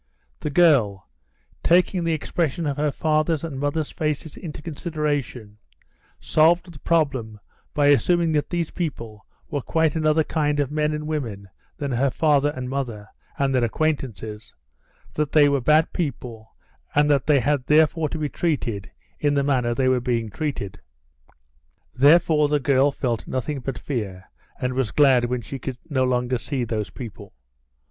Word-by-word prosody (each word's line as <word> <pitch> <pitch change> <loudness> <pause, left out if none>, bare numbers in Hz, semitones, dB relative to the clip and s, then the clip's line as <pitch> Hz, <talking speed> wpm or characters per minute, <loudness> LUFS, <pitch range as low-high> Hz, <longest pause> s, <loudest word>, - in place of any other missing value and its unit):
The 150 - -3
girl, 135 - +3 0.5
taking 180 +1 +3
the 165 - 0
expression 160 +1 -2
of 145 -2 -1
her 150 0 +1
father's 155 +1 0
and 150 -5 -5
mother's 145 +2 -1
faces 150 0 -3
into 160 -5 -8
consideration, 145 - -3 0.6
solved 170 +3 +2
the 145 - -13
problem 135 -10 0 0.4
by 145 -1 +4
assuming 170 +3 +3
that 150 -2 0
these 170 -2 -2
people 115 -11 -5 0.2
were 145 -2 -1
quite 160 +3 +1
another 155 0 +2
kind 150 -2 0
of 145 -1 0
men 150 0 0
and 150 0 -4
women 115 -11 -4 0.3
than 140 -2 -3
her 130 +3 +2
father 145 0 +2
and 130 -1 -5
mother 120 -6 -4 0.3
and 135 -1 +1
their 125 -2 +2
acquaintances, 115 -6 -3 0.6
that 150 -1 -2
they 150 -2 +6
were 140 -2 +1
bad 155 +5 +3
people, 120 -9 -5 0.4
and 145 0 +4
that 140 -2 +1
they 145 -2 +5
had 140 0 0
therefore 155 +1 +3
to 160 - -4
be 155 -1 -1
treated 130 - -2 0.3
in 145 -1 +1
the 140 - +2
manner 125 -4 +1
they 130 +1 +1
were 130 -1 +2
being 115 -3 -1
treated. 135 -8 -4 1.1
Therefore 150 +2 +5
the 150 0 +1
girl 140 +1 +3
felt 125 -5 -3
nothing 135 +3 -3
but 130 0 -5
fear, 100 -9 -5 0.3
and 125 0 -1
was 130 -4 0
glad 130 -2 +4
when 125 0 -2
she 135 +4 -7
could 130 0 -5
no 130 -2 +2
longer 125 -1 0
see 130 +2 -3
those 110 -3 -3
people. 110 -5 -10
140 Hz, 160 wpm, -23 LUFS, 125-155 Hz, 1.1 s, they